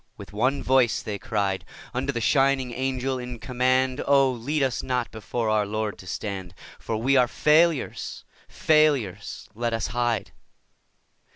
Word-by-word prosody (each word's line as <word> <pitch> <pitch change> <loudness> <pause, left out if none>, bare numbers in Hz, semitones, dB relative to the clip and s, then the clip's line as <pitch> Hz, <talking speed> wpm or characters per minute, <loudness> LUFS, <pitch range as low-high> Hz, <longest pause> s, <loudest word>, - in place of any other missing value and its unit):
With - - -11
one 130 +6 0
voice 130 -3 +3
they 105 -2 -4
cried 100 -6 -1 0.3
Unto 135 +3 -1
the 120 - -3
shining 135 +2 +2
Angel 130 0 -2
in 125 -1 -6
command: 130 +2 +1
'Oh, 135 -1 +5
lead 135 +5 -1
us 130 -3 0
not 125 -2 -2
before 115 +1 -3
our 105 -1 +2
Lord 110 -1 -3
to 95 - -12
stand, 95 -2 -5 0.2
For 110 - -3
we 130 +5 +2
are 125 -1 +5
failures, 155 +3 +1 0.2
failures! 150 - +1
Let 115 +1 -2
us 115 - -1
hide. 120 -3 0
125 Hz, 150 wpm, -25 LUFS, 110-135 Hz, 0.3 s, Oh